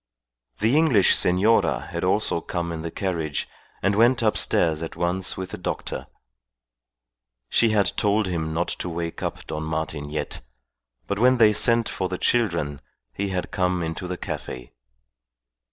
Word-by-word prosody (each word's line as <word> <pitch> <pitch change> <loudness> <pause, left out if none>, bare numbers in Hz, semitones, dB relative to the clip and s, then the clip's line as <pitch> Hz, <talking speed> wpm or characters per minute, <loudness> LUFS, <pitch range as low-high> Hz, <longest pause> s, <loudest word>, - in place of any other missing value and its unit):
The 110 +6 +2
English 150 - +5
senora 95 +6 +2
had - - -4
also - - +1
come 85 -1 -3
in 80 -1 -5
the 85 - -4
carriage, 80 -5 -3 0.4
and 95 +2 +2
went 120 +3 +3
upstairs 85 -7 +2
at 80 - -6
once 90 +2 -1
with 95 -1 -5
the - - -6
doctor. 90 - -4 1.4
She 115 - +4
had 105 -2 +2
told 105 +1 +2
him 80 -4 -2
not 85 +2 -1
to 90 - -3
wake 85 0 -5
up - - -4
Don 75 - -5
Martin 80 -2 -4
yet; 75 0 -5 0.6
but 100 - -3
when 125 +2 +5
they 110 -3 +6
sent 115 +1 +5
for 95 - -3
the 90 - -3
children 85 -13 0 0.3
he 100 - -2
had 95 -1 -3
come 90 -3 0
into 80 +3 -4
the 90 0 -4
cafe. 60 -7 -7
90 Hz, 155 wpm, -24 LUFS, 80-105 Hz, 1.4 s, they